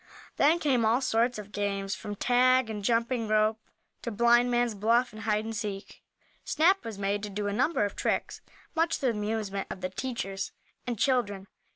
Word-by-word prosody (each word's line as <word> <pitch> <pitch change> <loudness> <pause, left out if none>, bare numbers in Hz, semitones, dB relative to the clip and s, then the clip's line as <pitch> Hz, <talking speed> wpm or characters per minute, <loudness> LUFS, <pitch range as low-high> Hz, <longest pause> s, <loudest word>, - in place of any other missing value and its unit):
Then 305 +4 +5
came 270 -8 +1
all 225 +3 +3
sorts 240 -1 +1
of 210 -1 -9
games, 200 -1 -2
from 205 -1 -6
tag 250 +1 +3
and 210 -2 -5
jumping 230 +1 +1
rope, 215 +1 +2 0.4
to - - -4
blindman's 240 +1 +3
bluff 230 +4 +2
and 215 - -9
hide 215 -1 0
and 225 0 -4
seek. 205 -2 -5 0.4
Snap 365 +6 +3
was 225 -3 -6
made 200 +1 -1
to 210 - -5
do 205 +1 -4
a 205 - -1
number 255 +1 +1
of 205 - -5
tricks, - - -2 0.3
much 330 0 +1
to - - -7
the 265 - +2
amusement 210 -2 -3
of 190 - -7
the 185 - -2
teachers 195 -4 -4 0.3
and 240 -2 -2
children. 205 -7 0
220 Hz, 185 wpm, -28 LUFS, 205-245 Hz, 0.4 s, Then